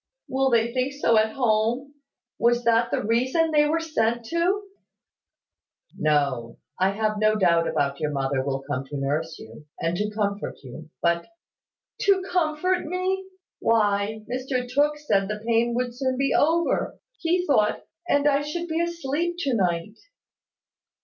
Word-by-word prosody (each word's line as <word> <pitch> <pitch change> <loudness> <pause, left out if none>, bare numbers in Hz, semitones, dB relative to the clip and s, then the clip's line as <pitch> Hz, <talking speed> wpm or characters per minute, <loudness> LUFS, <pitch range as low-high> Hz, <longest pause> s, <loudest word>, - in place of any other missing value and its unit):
"Will 265 +1 +1
they 235 -1 +2
think 255 +2 0
so 280 -5 +2
at 220 0 +1
home? 240 +3 0 0.5
Was 240 +1 +3
that 235 0 +3
the - - -1
reason 260 +9 +1
they 295 -1 +4
were 320 +2 +1
sent 235 -8 0
to?" 360 +5 +1 1.3
"No: 140 -6 0 0.2
I 190 +1 +4
have 215 +1 -1
no 215 0 +3
doubt 165 -7 +1
your 155 -1 -1
mother 135 -2 -1
will 135 0 -2
come 135 -1 -3
to 145 +1 -6
nurse 155 +4 -2
you, 115 +7 -13
and 165 +1 -1
to 210 +2 -1
comfort 205 -1 -2
you: 155 +5 -10
but 170 0 +1 0.4
" - - -63
"To 390 -2 +4
comfort 355 +1 +1
me? 370 +3 -1 0.3
Why, 215 -1 +1
Mr 255 0 -2
Tooke 290 +4 +2
said 200 -10 +1
the 210 +1 -5
pain 235 0 +2
would 245 0 -1
soon 260 0 -1
be 275 0 +1
over, 330 +3 +1 0.2
he 355 +1 +1
thought, 215 -9 +2 0.2
and 285 +1 +3
I 285 -1 +3
should 340 +4 -4
be 325 0 -1
asleep 340 0 -2
to 275 -4 0
night." 180 0 -1
235 Hz, 155 wpm, -25 LUFS, 190-295 Hz, 1.3 s, they